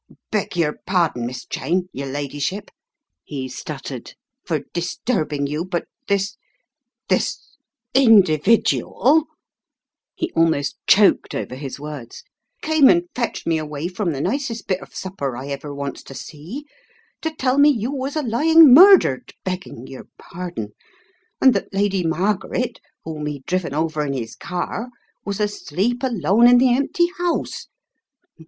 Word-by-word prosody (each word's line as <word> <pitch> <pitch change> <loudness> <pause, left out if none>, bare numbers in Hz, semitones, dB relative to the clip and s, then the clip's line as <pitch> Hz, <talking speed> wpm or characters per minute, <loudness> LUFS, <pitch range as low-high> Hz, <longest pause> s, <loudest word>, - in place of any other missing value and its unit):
"Beg 205 -4 -2
yer 155 -3 0
pardon, 165 -10 +1
Miss 125 0 -7
Cheyne, 180 +6 -1
yer 140 +1 -5
ladyship/' 145 +8 -4 0.5
he 135 -3 -5
stuttered 135 -1 -7 0.3
"for 155 -4 -1
disturbing 165 - -1
you 150 +3 -2
— 185 - -19
but 175 - -1 0.2
this 200 +4 0 0.4
— - - -63
this 300 -1 -1
— 235 +1 -63 0.2
individual 225 - +4 0.3
— - - -67
," - - -69
he 340 +1 -3
almost 160 -4 +1
choked 205 0 +4
over - - -4
his 135 +1 -7
words 145 -5 -8 0.2
— - - -50
"came 315 -4 +5
and 345 0 +3
fetched 240 -2 -3
me 165 -1 +1
away 150 +1 -4
from 185 -1 -2
the 140 -2 -3
nicest 235 - -2
bit 185 -1 -1
of - - -14
supper 140 -10 -4
I 135 +3 -7
ever 140 +1 -5
wants 140 -1 -5
to 135 - -10
see, 170 - -8 0.6
to 320 - -1
tell 260 -1 +1
me 290 +1 +7
you 240 -2 0
was 275 +1 -4
a 305 - 0
lying 300 +4 +6
murdered, 355 - +7
begging 185 -9 -5
yer 130 - -10
pardon, 170 -12 -7 0.7
and 265 -1 +6
that 200 - -3
Lady 195 -2 +1
Mar 180 +6 +1
garet, 250 +5 -4 0.2
whom 155 -2 -5
he'd 145 -3 -6
driven 175 -5 -2
over 155 -1 0
in 140 -2 -2
his 115 -4 -5
car, 180 +7 -4 0.4
was 200 0 -3
asleep 210 +2 -1
alone 235 -2 +3
in 245 0 +7
the 250 0 +4
empty 280 +6 +2
house. 350 -1 -2
185 Hz, 155 wpm, -21 LUFS, 145-245 Hz, 0.7 s, me